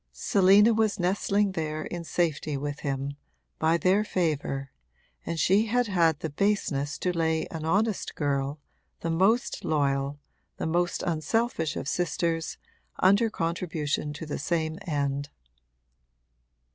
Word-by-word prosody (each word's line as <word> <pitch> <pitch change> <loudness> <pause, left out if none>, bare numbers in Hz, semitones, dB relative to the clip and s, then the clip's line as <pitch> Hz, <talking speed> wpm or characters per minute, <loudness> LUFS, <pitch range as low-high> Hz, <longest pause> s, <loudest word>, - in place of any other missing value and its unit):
Selina 200 - +5
was 215 -2 +1
nestling 195 +2 +1
there 155 -3 -3
in 175 -1 -5
safety 160 -3 -1
with 145 +1 -4
him, 140 0 -3 0.4
by 160 +1 +3
their 190 +4 +3
favour, 145 -8 -1 0.6
and 165 - -2
she 200 +8 +3
had 245 +3 +2
had 170 -7 +2
the 160 - -2
baseness 145 -6 0
to 180 -1 -1
lay 160 -1 +1
an 160 -1 -5
honest 205 +5 0
girl, 140 0 -1 0.4
the 165 - -1
most 195 +9 +2
loyal, 140 -1 0 0.4
the - - -3
most 175 +2 0
unselfish 170 - 0
of - - -4
sisters, 165 0 -1 0.4
under 200 +5 +4
contribution 165 -5 -2
to 150 +2 -7
the 150 - -4
same 160 0 -1
end. 140 -2 -1
165 Hz, 130 wpm, -27 LUFS, 145-190 Hz, 0.6 s, Selina